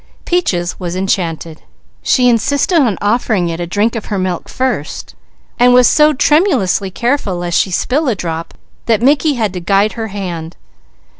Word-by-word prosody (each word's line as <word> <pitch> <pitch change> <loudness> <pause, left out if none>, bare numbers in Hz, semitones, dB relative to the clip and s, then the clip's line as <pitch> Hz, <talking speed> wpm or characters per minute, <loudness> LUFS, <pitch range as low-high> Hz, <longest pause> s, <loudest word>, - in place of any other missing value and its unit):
Peaches 180 - -1
was 175 -1 -4
enchanted. 170 -4 -2 0.4
She 250 -2 +2
insisted 280 - +2
on 230 - +1
offering 205 -4 +1
it 165 0 -4
a 175 - -3
drink 210 +6 0
of 225 - -5
her 205 - -3
milk 185 -2 -3
first, 255 - -3 0.5
and 245 0 +5
was 250 -1 +6
so 300 0 +4
tremulously 285 - +2
careful 235 -2 -1
lest 175 -1 0
she - - +1
spill 270 - 0
a 240 - +1
drop 165 -2 -5 0.3
that 225 -1 +1
Mickey 290 +2 +3
had 215 -6 -1
to 180 - -4
guide 195 +4 +1
her 225 -1 -5
hand. 175 -5 -6
205 Hz, 165 wpm, -15 LUFS, 175-250 Hz, 0.5 s, was